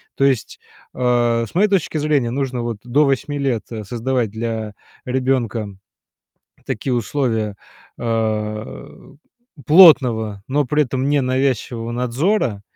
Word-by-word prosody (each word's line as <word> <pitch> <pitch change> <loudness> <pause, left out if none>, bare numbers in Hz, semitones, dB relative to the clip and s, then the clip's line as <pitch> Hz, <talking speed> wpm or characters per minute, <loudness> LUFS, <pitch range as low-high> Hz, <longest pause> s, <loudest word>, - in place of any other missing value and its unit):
То 135 - +2
есть, 130 -5 0 0.3
а, 120 -2 +1
с - - -20
моей 200 +4 +4
точки 190 -5 0
зрения, 145 -5 +1
нужно 130 -1 -2
вот 115 -2 -3
до 135 +5 +2
8 140 +1 -1
лет, 135 -6 -1
э, 110 -2 -5
создавать 120 +1 -2
для 110 -1 -4 0.3
ребенка 125 -4 -1 1.0
такие 125 +4 -2
условия, 115 -4 -1 0.4
а, 110 - -4 0.5
плотного, 125 - +6
но 145 +2 +1
при 150 +3 +2
этом 130 +1 -2
ненавязчивого 130 -4 0
надзора, 125 - 0
125 Hz, 120 wpm, -20 LUFS, 115-140 Hz, 1.0 s, плотного